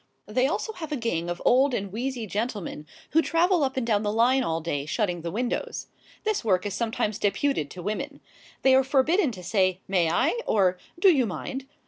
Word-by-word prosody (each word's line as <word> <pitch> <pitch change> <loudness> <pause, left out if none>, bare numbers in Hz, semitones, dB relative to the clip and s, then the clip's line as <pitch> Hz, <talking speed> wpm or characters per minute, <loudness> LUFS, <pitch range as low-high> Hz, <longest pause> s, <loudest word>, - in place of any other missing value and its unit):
They 250 +5 +1
have 275 - +1
also 440 - -3
a 305 -2 -3
gang 175 -8 -2
of 175 0 -4
old 260 +1 +4
and 200 -3 -3
wheezy 245 0 -3
gentlemen 205 -7 -4 0.2
who 325 - +5
travel 335 +2 +2
up 265 0 -1
and 255 - 0
down 210 -3 +2
the 205 -1 -1
line 240 +4 +3
all 165 -7 -1
day 145 -3 -3
shutting 180 -1 -1
the 170 - -4
windows. 240 +7 -3 0.3
This 430 -7 0
work 185 -4 +2
is 205 - -2
sometimes 220 -1 -1
deputed 200 - 0
to 180 +2 -9
women. 210 +3 -4 0.4
They 265 - +6
are 265 +1 +6
forbidden 285 +6 +2
to 180 -3 -9
say 185 -1 +1
"May 180 -4 +2
I?" 290 - +1
or 185 -3 +2 0.2
"Do 380 +1 +7
you 260 -6 +2
mind?" 195 - -5
225 Hz, 200 wpm, -26 LUFS, 185-265 Hz, 0.4 s, Do